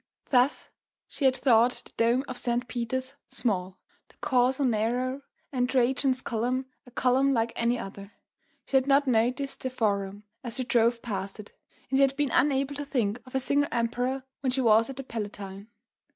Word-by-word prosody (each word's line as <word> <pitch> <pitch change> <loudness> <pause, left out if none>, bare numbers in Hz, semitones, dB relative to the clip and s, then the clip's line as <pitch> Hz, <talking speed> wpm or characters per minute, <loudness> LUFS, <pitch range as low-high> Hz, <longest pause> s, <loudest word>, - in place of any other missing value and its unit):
Thus 255 +1 +3 0.4
she 280 - -3
had 260 0 +4
thought 245 -1 +3
the - - -15
dome 240 +4 +2
of 255 - -5
St. 240 0 -1
Peter's 255 +3 -3
small, 185 -5 -2 0.3
the - - -23
Corso 260 0 +2
narrow 250 +3 0 0.3
and 250 -2 0
Trajan's 260 +1 +2
Column 250 +3 -1 0.2
a - - -11
column 260 +2 +2
like 230 0 0
any 235 +1 +1
other; 200 -2 -8 0.5
she 270 - +2
had 260 0 +1
not 280 +1 +4
noticed 255 +3 0
the 260 - -2
Forum 205 -4 -1 0.2
as 240 -2 -5
she 255 - -1
drove 235 -1 +2
past 195 -3 -4
it; 210 - -10 0.4
and 270 - +3
she - - +5
had 275 0 +4
been 290 -3 +1
unable 275 -1 +2
to 290 0 -5
think 240 -5 -1
of 255 - -10
a - - +3
single 285 +2 +1
emperor 245 +3 -1 0.2
when 270 - -1
she 260 +1 0
was 225 0 +4
at 270 - -7
the 270 - -5
Palatine. 205 -4 -6
250 Hz, 180 wpm, -28 LUFS, 230-265 Hz, 0.5 s, she